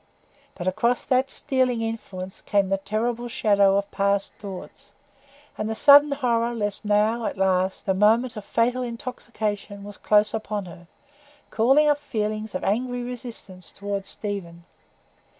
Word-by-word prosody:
But 175 - -5
across 235 +6 +1
that 260 +1 +2
stealing 255 -5 0
influence 190 -5 -5
came 200 -2 +1
the 195 0 +1
terrible 230 +4 -2
shadow 200 -4 +3
of 200 0 -2
past 200 0 0
thoughts; 195 -3 -10 0.7
and 215 +1 -2
the 220 - -2
sudden 285 +4 +7
horror 240 -3 0
lest 205 -2 -2
now, 215 +2 +2
at - - -5
last, 190 0 +1
the 190 - +2
moment 225 +5 +3
of 210 - -6
fatal 245 +4 +1
intoxication 220 -4 -5
was 205 -1 -10
close 210 0 +3
upon 215 -2 -3
her, 175 0 -12 0.6
called 240 +5 +3
up 300 -1 +4
feelings 215 -6 -3
of 185 - -3
angry 245 +4 -1
resistance 235 -7 -7
toward 200 -1 -4
Stephen. 175 -6 -6
215 Hz, 145 wpm, -24 LUFS, 200-240 Hz, 0.7 s, sudden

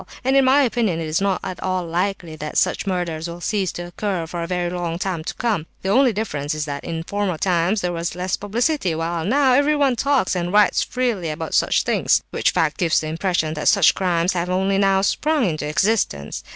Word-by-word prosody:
And 265 +2 +2
in 270 -1 +5
my 275 +2 +5
opinion 225 -9 0
it 165 - -3
is 155 +4 -1
not 195 -2 0
at 185 - -6
all 185 -1 -1
likely 175 -1 -2
that 150 0 -5
such - - +1
murders 175 -3 -2
will 170 0 -7
cease 190 0 -1
to 175 - -5
occur 180 -1 -3
for 170 +1 -5
a 170 - -3
very 175 -1 -2
long 175 -2 -3
time 180 -3 -3
to - - -5
come. 210 -10 -1 0.2
The 190 - -1
only 255 +4 +4
difference 155 -9 -3
is 155 -1 -2
that 140 -1 -5
in 165 -1 -4
former 200 -2 -2
times 180 +4 +1
there 180 0 -1
was 170 0 -3
less 180 +1 -1
publicity, 220 - -1
while 165 +1 -2
now 260 - +3
everyone 285 -1 +3
talks 265 -6 +1
and 175 0 -2
writes 210 +1 +4
freely 235 -10 -1
about 155 +1 -5
such - - +2
things—which - - +1
fact 155 -2 0
gives 165 -3 +2
the 155 - -4
impression 165 -1 -1
that 150 - -3
such 200 -6 +5
crimes 180 -1 0
have 175 0 -2
only 190 +1 +1
now 195 -1 +3
sprung 295 +5 +1
into 155 -3 -3
existence. 155 - 0
180 Hz, 215 wpm, -21 LUFS, 165-205 Hz, 0.2 s, in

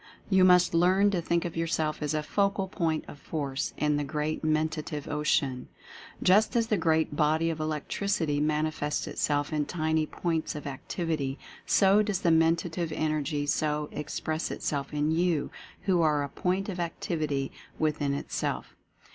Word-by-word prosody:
You 190 -1 +5
must 180 -1 +5
learn 185 +4 +4
to 180 -3 0
think 170 +1 0
of 175 - -4
yourself 160 -2 -1
as 150 0 -1
a 155 - -1
Focal 200 +3 0
Point 165 -5 -1
of 145 - -10
Force 140 -3 -3
in 150 -1 +1
the 145 - 0
Great 150 +2 -2
Mentative 155 -1 -1
Ocean. 145 -3 0 0.6
Just 205 +6 +4
as 230 -1 +3
the 225 - +1
great 160 -5 +1
body 155 +2 +2
of 160 - -5
Electricity 155 +1 -1
manifests 150 0 0
itself 145 0 -1
in 150 -1 0
tiny 160 -2 0
points 165 -3 -2
of 150 - -6
activity, 140 0 -3 0.3
so 195 +2 +5
does 205 -3 -1
the 170 - +3
Mentative 165 +1 +2
Energy 155 -1 -1
so 150 0 0
express 155 +2 -3
itself 140 -2 -3
in 150 +1 0
YOU 165 -2 +1 0.3
who 180 -3 +2
are 150 -3 +2
a 140 - -4
Point 185 +5 -1
of 185 -3 -4
Activity 155 -5 -2 0.3
within 145 -2 0
Itself. - - -3
155 Hz, 155 wpm, -28 LUFS, 150-175 Hz, 0.6 s, You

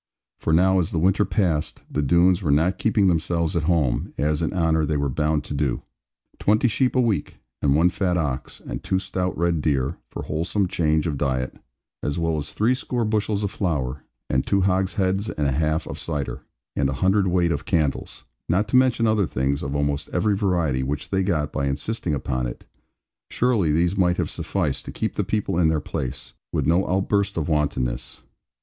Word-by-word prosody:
For - - -1
now 95 +3 +4
as 85 - 0
the - - -3
winter 95 +5 +3
passed, 90 -5 -1
the 75 - -1
Doones 85 +5 +4
were 80 - -2
not 80 +6 +2
keeping 105 -2 +2
themselves 85 -1 +1
at 85 - +2
home, 75 -8 +1
as 75 +1 0
in 80 - 0
honour 80 -3 +2
they 75 0 0
were 70 -1 0
bound 75 +2 0
to - - -6
do. 70 -3 -1 0.6
Twenty 110 +4 +3
sheep 125 +3 +1
a - - +4
week, 115 -6 0 0.2
and 70 -1 +3
one 85 +4 +4
fat 90 -1 0
ox, 70 -6 -3
and - - -5
two 95 - 0
stout 95 -1 -2
red 85 -1 +1
deer 70 0 0
(for - - -6
wholesome 90 +6 -1
change 80 -3 +1
of 75 -5 -2
diet), 65 -2 -1 0.4
as 75 - -2
well 80 -1 0
as 75 0 -4
threescore 120 +1 0
bushels 105 -1 0
of 100 - -1
flour, 70 -10 -2 0.2
and 65 - 0
two 100 -1 +2
hogsheads 95 +2 +1
and 75 - -2
a 70 - +2
half 80 +3 0
of - - -6
cider, 75 -5 -3 0.3
and 70 -1 +1
a - - -1
hundredweight 90 +1 +2
of - - -2
candles, 80 -9 -1 0.2
not 95 +5 +2
to - - 0
mention 125 -2 +4
other 110 -4 +2
things 70 +2 -1
of 70 +1 -3
almost 70 +1 -1
every 100 +3 +1
variety 85 -10 +1
which 70 +2 -3
they 95 -1 +2
got 80 -6 0
by 70 - 0
insisting 75 +4 -2
upon 65 -2 -2
it - - -8 0.6
surely 115 -10 +2
these 85 +4 +2
might 90 -2 +2
have - - -1
sufficed - - -2
to - - -7
keep - - -2
the - - -1
people 105 -5 -1
in 85 - +4
their 80 -1 +2
place, 65 -2 -5 0.2
with - - 0
no 85 +4 +2
outburst 100 +1 +1
of 80 - -1
wantonness. 65 -6 -1
85 Hz, 195 wpm, -23 LUFS, 75-95 Hz, 0.6 s, now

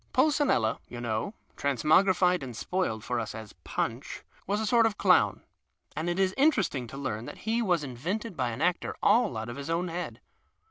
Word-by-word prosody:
Pulcinella, 285 - +3
you 120 - -8
know 120 - -2 0.2
(trans 140 -4 -1
mogrilied, 180 +2 +4
and 125 -4 -7
spoiled, 180 - -2
for 125 -1 -1
us 110 -2 -4
as 110 -2 -9
Punch), - - -3 0.2
was 205 +2 0
a 220 - -1
sort 230 +1 +5
of 210 -2 -4
clown, 180 - +3 0.5
and 160 +4 -2
it 175 - -1
is 190 -1 +2
interesting 215 - +2
to 135 - -9
learn 120 -5 -3
that - - -10
he 230 +2 +2
was 175 -8 +1
invented 180 - -4
by 125 -4 0
an 120 +5 -3
actor 180 0 0
all 215 - +4
out 110 +1 -4
of 120 +3 -6
his 140 +1 -6
own 170 +2 0
head. 175 +2 -5
170 Hz, 195 wpm, -28 LUFS, 120-200 Hz, 0.5 s, sort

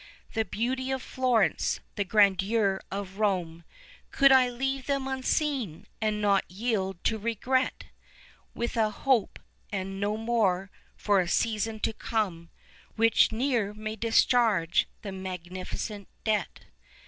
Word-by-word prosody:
The 220 -1 0
beauty 255 +6 -2
of 265 0 -1
Florence, 255 -3 +1
the 205 - -1
grandeur 200 0 +3
of 195 0 -6
Rome, 175 -5 0 0.5
Could 275 0 +5
I 260 -1 +6
leave 265 +2 -3
them 275 -1 0
unseen, 265 - -1 0.2
and 215 -1 0
not 200 -2 +3
yield 195 -2 -2
to 220 - +1
regret? 235 +4 0 0.7
With 235 +1 -2
a 220 -1 +3
hope 235 +1 +1 0.3
(and 195 -1 -4
no 205 +1 0
more) 205 -5 0 0.2
for 205 -2 +2
a 180 - 0
season 220 +3 0
to - - 0
come, 190 -8 -2 0.4
11 - - -33
Which 225 0 +4
ne'er 225 -3 0
may 215 0 -5
discharge 225 -6 +3 0.2
the 200 - -5
magnificent 185 +2 -6 0.2
debt? 210 -5 -1
215 Hz, 130 wpm, -28 LUFS, 195-240 Hz, 0.7 s, I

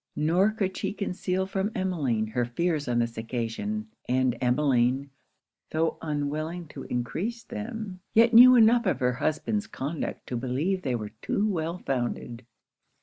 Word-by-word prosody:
Nor 175 +7 +3
could 200 -3 -2
she - - -2
conceal 190 -2 -2
from 195 +2 -2
Emmeline 145 - 0
her 115 +3 -1
fears 150 +5 -1
on 120 -1 +1
this 115 -1 -1
occasion; 125 - -3 0.2
and 130 -1 +2
Emmeline, 130 +1 +2 0.6
tho' 160 +1 0
unwilling 155 +3 -3
to 135 - -8
encrease 185 - -3
them, 215 -4 -6 0.2
yet 230 +1 +6
knew 250 +2 +10
enough 235 0 +5
of 135 - +1
her 125 -1 +2
husband's 155 - -1
conduct 150 -6 -4
to 125 - -4
believe 135 +10 -1
they 130 -6 -1
were 105 -3 -5
too 210 - 0
well 170 -3 -2
founded. 120 -4 -3
155 Hz, 145 wpm, -27 LUFS, 125-195 Hz, 0.6 s, knew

